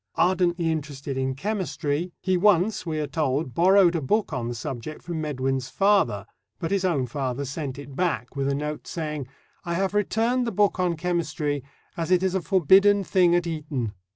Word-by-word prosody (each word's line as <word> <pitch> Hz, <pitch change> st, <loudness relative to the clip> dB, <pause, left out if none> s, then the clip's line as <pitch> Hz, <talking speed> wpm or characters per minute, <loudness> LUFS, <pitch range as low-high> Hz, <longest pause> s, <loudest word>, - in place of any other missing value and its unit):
Ardently 175 Hz, -2 st, +2 dB
interested 140 Hz, -3 st, -4 dB
in 130 Hz, 0 st, -1 dB
chemistry, 170 Hz, -2 st, -2 dB
he 185 Hz, -1 st, 0 dB
once, 185 Hz, 0 st, +2 dB
we 155 Hz, -1 st, -2 dB
are 150 Hz, -, -1 dB
told, 140 Hz, -2 st, -1 dB
borrowed 180 Hz, 0 st, +5 dB
a 165 Hz, -, 0 dB
book 200 Hz, +6 st, 0 dB
on 120 Hz, -3 st, -2 dB
the 120 Hz, -, -4 dB
subject 130 Hz, +5 st, -6 dB
from 165 Hz, -2 st, -4 dB
Medwin's 135 Hz, -3 st, -2 dB
father, 195 Hz, -, +2 dB, 0.3 s
but 165 Hz, +7 st, -4 dB
his 200 Hz, -1 st, +1 dB
own 160 Hz, -8 st, +1 dB
father 130 Hz, +1 st, -3 dB
sent 140 Hz, -1 st, -5 dB
it 140 Hz, -1 st, -9 dB
back 140 Hz, -8 st, -1 dB
with 135 Hz, -1 st, -1 dB
a 140 Hz, -, +1 dB
note 150 Hz, +1 st, -4 dB
saying: 150 Hz, -5 st, -4 dB, 0.4 s
"I 170 Hz, -1 st, -2 dB
have 195 Hz, +2 st, 0 dB
returned 230 Hz, +4 st, +1 dB
the -, -, -1 dB
book 200 Hz, -1 st, +2 dB
on 180 Hz, -2 st, +1 dB
chemistry, 155 Hz, -5 st, -1 dB, 0.3 s
as 165 Hz, 0 st, -3 dB
it 185 Hz, 0 st, +3 dB
is 190 Hz, -1 st, +1 dB
a 190 Hz, -, 0 dB
forbidden 195 Hz, +4 st, +4 dB
thing 180 Hz, -2 st, +3 dB
at 175 Hz, 0 st, +1 dB
Eton." 150 Hz, -9 st, -3 dB
165 Hz, 185 wpm, -25 LUFS, 140-185 Hz, 0.4 s, borrowed